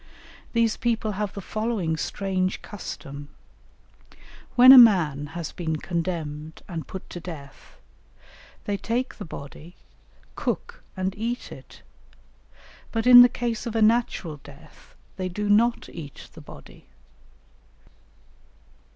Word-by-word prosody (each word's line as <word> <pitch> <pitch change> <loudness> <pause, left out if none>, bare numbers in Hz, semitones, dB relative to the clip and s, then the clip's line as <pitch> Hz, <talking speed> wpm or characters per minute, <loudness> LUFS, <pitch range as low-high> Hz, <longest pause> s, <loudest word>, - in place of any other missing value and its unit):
These 230 -2 +2
people 225 -3 -1
have 205 0 -4
the 200 - -5
following 215 -6 -2
strange 185 +3 -2
custom: 145 -7 -8 1.3
when 255 +1 +9
a 265 - +11
man 160 - +5
has 170 -3 -5
been 160 -3 -3
condemned 160 -2 -4
and 165 -4 -6
put 190 - -8
to 175 - -6
death, 155 -6 -11 0.9
they 205 -1 -1
take 235 +6 -3
the 205 - -6
body, 155 +3 -10 0.6
cook, - - -4 0.2
and 185 0 -1
eat 235 +3 -4
it; - - -13 1.1
but 225 0 -2
in 250 -1 +11
the 245 - +8
case 235 -2 -3
of 230 - -5
a 225 - +1
natural 215 -8 +1
death 145 +2 -17 0.2
they 185 -1 -3
do 210 +3 -3
not 230 +4 +2
eat 150 -5 -10
the - - -12
body. - - -14
190 Hz, 125 wpm, -25 LUFS, 160-225 Hz, 1.3 s, a